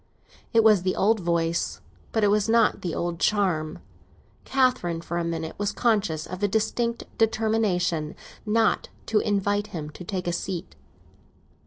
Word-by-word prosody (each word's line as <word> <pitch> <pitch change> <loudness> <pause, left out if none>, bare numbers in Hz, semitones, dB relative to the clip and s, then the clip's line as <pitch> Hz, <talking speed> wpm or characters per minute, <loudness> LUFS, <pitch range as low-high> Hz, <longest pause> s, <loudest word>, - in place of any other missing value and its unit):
It 230 -2 +5
was 215 -4 +6
the 185 +1 0
old 220 +2 +3
voice, 170 -1 0 0.3
but 220 - +1
it 205 - +4
had 210 +1 +2
not 230 -1 +3
the 175 -3 -3
old 170 -1 -2
charm. 180 -8 +1 0.7
Catherine, 255 -11 +1
for 170 +1 -3
a - - -1
minute, 165 -1 -3
was 205 0 0
conscious 205 -9 +1
of 185 +2 -7
a 205 - +3
distinct 230 +3 0 0.2
determination 215 -8 +1 0.3
not 220 0 +1 0.2
to 220 - +2
invite 205 0 0
him 150 -3 -6
to 180 - -10
take 185 0 -4
a 175 - -1
seat. 180 0 -4
200 Hz, 155 wpm, -25 LUFS, 170-220 Hz, 0.7 s, was